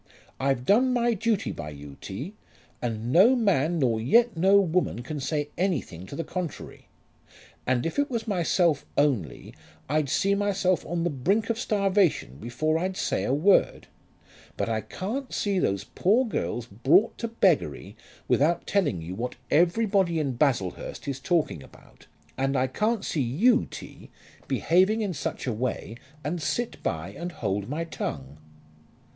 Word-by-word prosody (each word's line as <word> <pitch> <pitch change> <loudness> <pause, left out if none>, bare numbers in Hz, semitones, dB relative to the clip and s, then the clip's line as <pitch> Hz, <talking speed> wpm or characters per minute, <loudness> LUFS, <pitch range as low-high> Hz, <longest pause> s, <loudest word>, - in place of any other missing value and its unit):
I've 135 -2 0
done 250 - +4
my 240 -1 +2
duty 220 0 0
by 75 - -6
you, 70 -1 -10
T., 135 - -6 0.5
and 115 0 -3
no 200 - +6
man 175 - +2
nor 120 -7 +1
yet 230 - +4
no 190 +4 +5
woman 175 -9 0
can 150 +4 -5
say 145 +1 -2
anything 140 - -2
to - - -8
the 165 - -3
contrary. 175 0 -6 0.8
And 125 -1 +1
if 165 - -2
it 285 - +1
was 230 -3 -3
myself 175 -5 +2
only 120 - 0 0.3
I'd 150 0 0
see 195 +7 +2
myself 195 -3 +1
on 170 0 -1
the 175 - 0
brink 195 - +1
of 230 - -3
starvation 195 - +1
before 155 - -1
I'd 185 +2 -2
say - - -1
a - - 0
word; 160 +9 +3 0.7
but - - -1
I 110 -1 -1
can't 245 - -5
see 200 -2 0
those 100 - 0
poor 200 - +2
girls 120 - -3
brought 130 - +3
to 230 - -2
beggary 180 - +1 0.3
without 165 +4 +2
telling 175 - 0
you 85 +3 -6
what 120 +6 -4 0.2
everybody 180 +1 +3
in 140 -3 0
Baslehurst 120 -9 -1
is 135 -1 -3
talking 155 - 0
about; - - -18 0.3
and 135 +1 +1
I 130 - +2
can't 210 - -1
see 150 - -1
you, 190 - +3
T., - - -10 0.4
behaving 190 +6 +2
in 200 -4 -1
such 145 - -4
a 125 - -1
way 115 -1 -3 0.3
and 165 +3 -3
sit 235 +10 -2
by 80 +2 -3
and 170 - -6
hold 100 - -2
my 155 +4 -2
tongue." 70 - -6
160 Hz, 160 wpm, -26 LUFS, 125-200 Hz, 0.8 s, no